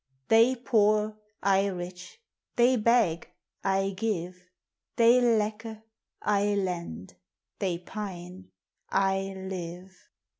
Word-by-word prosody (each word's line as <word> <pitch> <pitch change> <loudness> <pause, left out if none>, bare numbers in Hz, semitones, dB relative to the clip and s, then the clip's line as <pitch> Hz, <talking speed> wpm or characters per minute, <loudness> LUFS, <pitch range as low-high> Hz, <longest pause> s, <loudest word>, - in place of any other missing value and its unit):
They 230 +3 +5
poor, 215 -3 +2 0.3
T 195 0 +3
rich; 180 - -8 0.4
they 245 +2 +4
beg, 220 -8 +2 0.3
I 195 0 +1
give; 180 -4 -3 0.5
They 235 +1 +5
lacke, 220 -1 0 0.4
I 205 0 +2
lend; 170 - -4 0.4
they 185 -4 -1
pine, 180 -1 -8 0.4
I 195 0 0
live. 185 -1 -7
195 Hz, 90 wpm, -28 LUFS, 180-220 Hz, 0.5 s, They